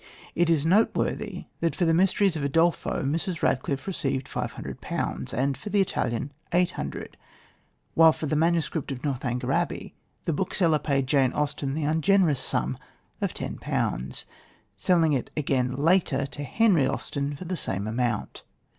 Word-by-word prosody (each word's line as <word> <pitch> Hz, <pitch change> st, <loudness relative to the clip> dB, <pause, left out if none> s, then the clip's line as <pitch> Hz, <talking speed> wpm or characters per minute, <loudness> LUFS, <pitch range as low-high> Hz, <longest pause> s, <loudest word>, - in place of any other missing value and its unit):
It 170 Hz, 0 st, +2 dB
is 160 Hz, -3 st, +2 dB
noteworthy 200 Hz, +7 st, +1 dB
that 165 Hz, 0 st, 0 dB
for 175 Hz, -, +1 dB
the 165 Hz, -, +3 dB
Mysteries 190 Hz, +1 st, +3 dB
of 155 Hz, -, -2 dB
Udolpho 165 Hz, +3 st, +1 dB
Mrs. 165 Hz, +4 st, -1 dB
Radcliffe 135 Hz, +1 st, 0 dB
received 140 Hz, -8 st, -2 dB
£500, -, -, -4 dB
and 135 Hz, +3 st, 0 dB
for 210 Hz, -, -8 dB
The 205 Hz, 0 st, +2 dB
Italian 130 Hz, -, 0 dB, 0.2 s
£800; 175 Hz, 0 st, -1 dB, 0.8 s
while 165 Hz, 0 st, +7 dB
for 155 Hz, -, -5 dB
the 155 Hz, -, 0 dB
manuscript 165 Hz, -2 st, +1 dB
of 130 Hz, -2 st, -6 dB
Northanger 125 Hz, -3 st, -2 dB
Abbey, -, -, -1 dB, 0.3 s
the 165 Hz, -, +1 dB
bookseller 170 Hz, -2 st, +1 dB
paid 140 Hz, -2 st, 0 dB
Jane 135 Hz, -1 st, +2 dB
Austen 145 Hz, -2 st, -1 dB
the 155 Hz, -, -2 dB
ungenerous 160 Hz, 0 st, +3 dB
sum 65 Hz, +1 st, -1 dB, 0.4 s
of -, -, -1 dB
£10, 65 Hz, +2 st, -3 dB, 0.5 s
selling 160 Hz, -, +3 dB
it 130 Hz, -, -1 dB
again 130 Hz, -4 st, +1 dB
later 150 Hz, -2 st, +2 dB
to 145 Hz, +2 st, -7 dB
Henry 180 Hz, -, +3 dB
Austen 140 Hz, +1 st, -2 dB
for 180 Hz, -, -8 dB
the 185 Hz, +2 st, -2 dB
same 100 Hz, -, -2 dB
amount. 120 Hz, +2 st, -2 dB
150 Hz, 145 wpm, -26 LUFS, 135-170 Hz, 0.8 s, while